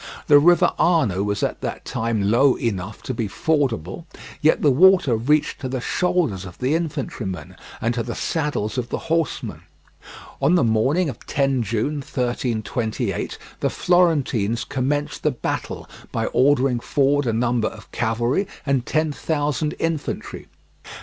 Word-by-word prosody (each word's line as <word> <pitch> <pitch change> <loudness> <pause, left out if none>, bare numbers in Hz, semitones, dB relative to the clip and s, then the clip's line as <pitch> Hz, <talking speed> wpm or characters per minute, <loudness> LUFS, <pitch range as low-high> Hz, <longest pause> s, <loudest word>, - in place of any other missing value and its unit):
The 145 -1 +7
river 175 +4 +4
Arno 135 - +3
was 105 0 -1
at - - -2
that - - -5
time 110 -3 -1
low 130 +3 +5
enough 100 -2 -4
to 130 - -3
be 115 -2 -2
fordable, 135 - -1 0.4
yet 155 - +3
the 145 - +5
water 180 -3 +5
reached 145 +8 +1
to 130 - -3
the 130 0 -2
shoulders 160 - 0
of 90 -2 -10
the 130 +3 0
infantrymen 140 - -3 0.2
and 115 +2 0
to 120 - -1
the - - -4
saddles 145 -9 -1
of 120 -1 -4
the - - -2 0.2
horsemen. 165 -4 -1 0.8
On 175 - +4
the 175 - +3
morning 130 +10 +2
of 130 - -7
10 135 -2 +1
June 115 +7 -1
1328, 120 -5 -2 0.2
the - - +1
Florentines 140 - +2
commenced 145 +3 -2
the - - +2
battle - - -4 0.2
by - - -1
ordering 130 -2 +2
forward 140 +2 +1
a - - +2
number 120 -1 +1
of 110 - -10
cavalry 120 - 0 0.2
and 135 -3 0
ten 155 0 +1
thousand 150 0 -1
infantry. 165 -2 -3
130 Hz, 150 wpm, -22 LUFS, 115-150 Hz, 0.8 s, The